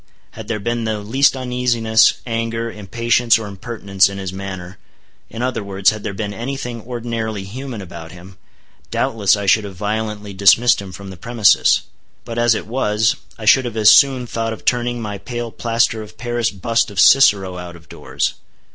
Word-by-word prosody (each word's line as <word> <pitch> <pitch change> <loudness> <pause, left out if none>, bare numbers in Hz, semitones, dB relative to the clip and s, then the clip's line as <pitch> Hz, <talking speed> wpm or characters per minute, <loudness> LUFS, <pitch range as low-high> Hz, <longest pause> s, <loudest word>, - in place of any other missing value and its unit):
Had 110 -1 -10
there 115 -2 -2
been 120 +3 -2
the 110 -1 -1
least 130 +8 +2
uneasiness, 120 -3 +2
anger, 115 0 -3
impatience 115 +3 +1
or 110 - -6
impertinence 100 -1 0
in 100 - -7
his 95 -1 -5
manner; 95 -1 -7 0.5
in 115 +2 -5
other 125 -4 -2
words, 95 -1 +2
had 110 -1 -7
there 105 - -4
been 105 0 -4
any 125 +7 -4
thing 120 -3 -6
ordinarily 115 -3 -4
human 120 +1 -7
about 85 -2 -10
him, 90 +2 -14 0.5
doubtless 105 -2 +1
I 100 - -4
should 110 +3 +4
have 100 -2 -8
violently 105 +1 -4
dismissed 100 +4 +4
him 95 -2 -9
from 95 +1 -9
the 95 - -11
premises. 115 +1 +3 0.4
But 115 0 -4
as 120 -1 +3
it - - -4
was, 110 -2 +1 0.2
I 110 - -8
should 130 +4 +5
have 115 -2 -5
as 110 0 +7
soon 130 -3 +5
thought 115 -1 -3
of 110 - -12
turning 120 -1 0
my 105 -2 -5
pale 120 +1 -5
plaster 115 -1 0
of 110 0 -12
paris 120 -1 -1
bust 115 +4 -1
of 100 -3 -5
Cicero 95 -6 +5
out 90 -1 -8
of 80 -2 -17
doors. - - -3
110 Hz, 185 wpm, -19 LUFS, 100-120 Hz, 0.5 s, as